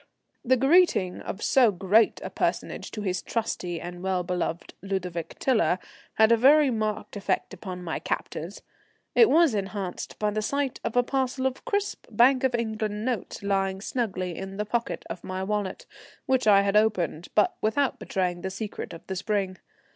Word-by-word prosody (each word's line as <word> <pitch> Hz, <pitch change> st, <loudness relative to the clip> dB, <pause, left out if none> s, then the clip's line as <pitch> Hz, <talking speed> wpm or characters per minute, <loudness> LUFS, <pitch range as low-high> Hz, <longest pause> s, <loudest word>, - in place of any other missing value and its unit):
The 260 Hz, +2 st, +3 dB
greeting 270 Hz, -, +3 dB
of 200 Hz, -, -6 dB
so 255 Hz, -4 st, +5 dB
great 200 Hz, +4 st, +3 dB
a -, -, -5 dB
personage -, -, -2 dB
to 210 Hz, -, -6 dB
his 185 Hz, -2 st, -1 dB
trusty 180 Hz, -7 st, -3 dB
and 175 Hz, +1 st, -7 dB
well 185 Hz, -1 st, 0 dB
beloved 175 Hz, -1 st, -3 dB
Ludovic 180 Hz, -4 st, -4 dB
Tiler 215 Hz, -10 st, +2 dB, 0.4 s
had 220 Hz, +1 st, +5 dB
a 230 Hz, -, +6 dB
very 280 Hz, +3 st, +6 dB
marked 215 Hz, -2 st, -2 dB
effect 200 Hz, -1 st, -1 dB
upon 185 Hz, -1 st, -7 dB
my 165 Hz, -2 st, -3 dB
captors. 170 Hz, +6 st, -4 dB, 0.5 s
It 460 Hz, -, +6 dB
was 325 Hz, -4 st, +5 dB
enhanced 195 Hz, -2 st, -4 dB
by 210 Hz, -1 st, 0 dB
the 215 Hz, +1 st, -1 dB
sight 280 Hz, +4 st, -1 dB
of 230 Hz, -, -3 dB
a 245 Hz, -, +5 dB
parcel 260 Hz, 0 st, -1 dB
of 265 Hz, 0 st, -2 dB
crisp 405 Hz, 0 st, -2 dB
Bank 255 Hz, +2 st, +4 dB
of 260 Hz, -2 st, +2 dB
England 220 Hz, -2 st, -2 dB
notes 245 Hz, -5 st, -3 dB
lying 195 Hz, -1 st, 0 dB
snugly 190 Hz, -6 st, -2 dB
in 195 Hz, +2 st, -7 dB
the 210 Hz, -, -1 dB
pocket 235 Hz, +2 st, -2 dB
of 175 Hz, -, -6 dB
the 185 Hz, 0 st, -4 dB
wallet, 205 Hz, -2 st, -2 dB, 0.4 s
which 260 Hz, -3 st, +1 dB
I 200 Hz, -1 st, +7 dB
had 200 Hz, 0 st, 0 dB
opened, 185 Hz, -6 st, +1 dB
but 210 Hz, -, +3 dB
without 265 Hz, +4 st, +1 dB
betraying 180 Hz, -4 st, -2 dB
the 190 Hz, -, -3 dB
secret 205 Hz, +2 st, -6 dB
of 165 Hz, -, -11 dB
the 190 Hz, -, -4 dB
spring. 195 Hz, -1 st, -1 dB
210 Hz, 175 wpm, -26 LUFS, 185-240 Hz, 0.5 s, I